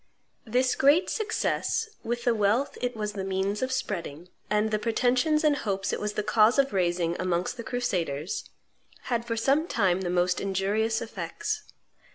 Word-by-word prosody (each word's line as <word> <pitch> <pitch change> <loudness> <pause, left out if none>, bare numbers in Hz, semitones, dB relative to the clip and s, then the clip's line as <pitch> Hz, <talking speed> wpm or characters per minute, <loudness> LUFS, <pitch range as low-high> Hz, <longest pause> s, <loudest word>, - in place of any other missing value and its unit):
This 250 +3 +2
great 290 +7 +4
success, 445 0 -1 0.2
with 240 +1 -2
the 240 - +3
wealth 220 +6 +1
it 245 -1 -1
was 210 -1 -3
the 195 -2 -4
means 195 +2 -1
of 260 0 -1
spreading, 175 - -4 0.2
and 210 +1 +1
the 215 - +1
pretensions 255 +7 +2
and 300 -2 +3
hopes 195 -5 -2
it - - -1
was 210 0 -2
the 210 - -1
cause 220 +4 +4
of 275 -3 +2
raising 175 -2 +1
amongst 180 +3 -1
the 235 - -7
crusaders, 180 - -2 0.6
had 235 0 0
for 230 -1 -2
some 275 +8 +2
time 190 - +1
the 180 - -2
most 180 0 +1
injurious 205 +4 0
effects. 225 - -4
215 Hz, 170 wpm, -27 LUFS, 190-245 Hz, 0.6 s, great